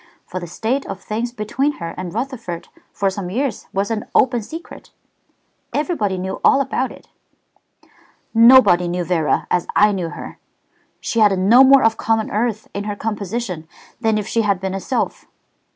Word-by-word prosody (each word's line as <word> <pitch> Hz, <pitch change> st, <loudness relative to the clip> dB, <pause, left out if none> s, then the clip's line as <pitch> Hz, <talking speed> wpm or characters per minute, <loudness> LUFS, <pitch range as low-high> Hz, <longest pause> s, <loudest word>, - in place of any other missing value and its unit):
"For 185 Hz, -, -5 dB
the 175 Hz, -, -7 dB
state 230 Hz, +10 st, -2 dB
of 195 Hz, -1 st, -6 dB
things 230 Hz, +4 st, -3 dB
between 245 Hz, +6 st, -1 dB
her 170 Hz, -7 st, -6 dB
and 180 Hz, -1 st, -5 dB
Rutherford 230 Hz, -, -5 dB, 0.2 s
for 195 Hz, -1 st, 0 dB
some 190 Hz, -2 st, -5 dB
years 260 Hz, +7 st, -2 dB
was 200 Hz, +3 st, -1 dB
an 215 Hz, -1 st, -2 dB
open 245 Hz, -2 st, +3 dB
secret. 325 Hz, +10 st, -10 dB, 0.9 s
Everybody 285 Hz, -, 0 dB
knew 190 Hz, +1 st, -4 dB
all -, -, +5 dB
about 275 Hz, -1 st, -1 dB
it." -, -, -14 dB, 1.3 s
"Nobody 225 Hz, -7 st, +7 dB
knew 175 Hz, +1 st, -1 dB
Vera 165 Hz, -3 st, 0 dB
as 180 Hz, -, +1 dB
I 210 Hz, 0 st, +5 dB
knew 180 Hz, -4 st, -2 dB
her. -, -, -9 dB, 0.6 s
She 230 Hz, -, -1 dB
had 205 Hz, -3 st, +5 dB
no 220 Hz, +8 st, +6 dB
more 270 Hz, 0 st, +6 dB
of 225 Hz, 0 st, +3 dB
common 225 Hz, -1 st, 0 dB
earth 215 Hz, 0 st, -1 dB
in 200 Hz, +1 st, -4 dB
her 205 Hz, -1 st, -3 dB
composition 205 Hz, -5 st, -4 dB, 0.3 s
than 220 Hz, -2 st, +1 dB
if 210 Hz, -1 st, -3 dB
she 230 Hz, -, +1 dB
had 200 Hz, -3 st, +1 dB
been 190 Hz, 0 st, -3 dB
a 195 Hz, -, -2 dB
sylph. 245 Hz, +7 st, -3 dB
210 Hz, 170 wpm, -20 LUFS, 185-240 Hz, 1.3 s, Nobody